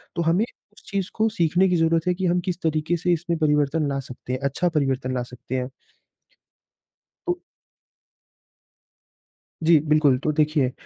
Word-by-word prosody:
तो 170 - 0
हमें 170 +7 +2
इस 210 -3 -23
चीज़ 195 -2 -1
को 220 0 +2
सीखने 180 -1 +2
की 180 - +2
ज़रूरत 165 +1 +2
है 180 - +3
कि 185 +1 -3
हम 180 0 +2
किस 175 0 -3
तरीके 160 +1 0
से 175 +1 +1
इसमें 170 0 -1
परिवर्तन 150 0 +2
ला 140 0 -1
सकते 125 -1 -7
हैं, 130 - -2
अच्छा 140 +6 0
परिवर्तन 135 -4 0
ला 125 -1 -1
सकते 125 +1 -7
हैं। 125 +1 -3 1.6
तो 355 0 +1 2.3
जी 165 0 +6
बिल्कुल। 150 -4 +4
तो 155 - +2
देखिए, 150 -4 +2
160 Hz, 160 wpm, -24 LUFS, 140-175 Hz, 2.3 s, जी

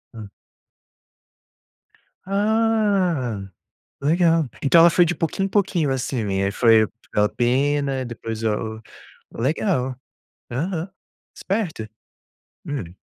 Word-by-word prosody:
Hum. 105 -2 -8 2.0
Ah, 200 - +1 0.6
legal. 165 0 +2
Então 155 +4 +5
ela 170 +1 +8
foi 175 +1 +4
de 175 +1 -1
pouquinho 175 +4 -1
em - - -4
pouquinho, 180 -8 +1
assim, 125 -2 -2
né? 95 -1 0
Aí - - 0
foi 115 0 +5 0.3
aquela 105 0 +3
pena, 135 +2 0
depois 115 -2 -6
ou, 110 0 -2 0.5
legal. 130 - -1 0.6
Aham, 165 +7 -3 0.5
esperto. 185 - -3 0.8
Hum. 95 - -5
145 Hz, 100 wpm, -22 LUFS, 115-180 Hz, 2.0 s, ela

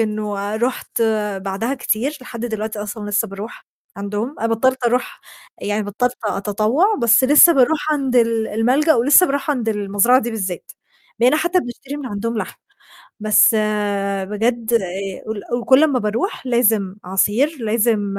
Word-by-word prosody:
إنه 210 -1 -2
رُحت 240 0 -2 0.3
بعدها 195 +7 -3
كتير، 265 +4 -2
لحد 240 -2 -9
دلوقتي 220 -1 -4
أصلًا 205 0 -6
لسّه 210 +1 0
باروح 200 +4 -9 0.3
عندهم، 205 +7 -4
أنا 230 - 0
بطّلت 260 +3 0
أروح 245 +2 -1 0.4
يعني 210 +1 -2
بطّلت 245 +5 -2
أتطوّع، 215 - +1
بس 230 +2 +5
لسّه 300 +5 +7
باروح 300 +3 +2
عند 270 -4 -1
ال 230 -2 +2
الملجأ 260 +9 +2
ولسّه 285 +9 +5
باروح 280 0 -2
عند 245 -6 -1
المزرعة 210 +4 +2
دي 235 - -4
بالذات، 190 -5 -5 0.5
بقينا 255 +5 +4
حتّى 345 +3 +1
بنشتري 270 +3 -8
من 285 -3 -6
عندهم 225 +1 -3
لحمة، - - -5 0.6
بس 215 -1 +5 0.8
بجد 225 +3 -2
آآ 235 - +5 0.8
ال - - -8
كل 265 +3 +6
أمّا 280 -5 +1
باروح 230 - -3
لازم 220 -6 +1
عصير، 210 - +1
لازم 215 -3 0
230 Hz, 145 wpm, -19 LUFS, 210-260 Hz, 0.8 s, لسّه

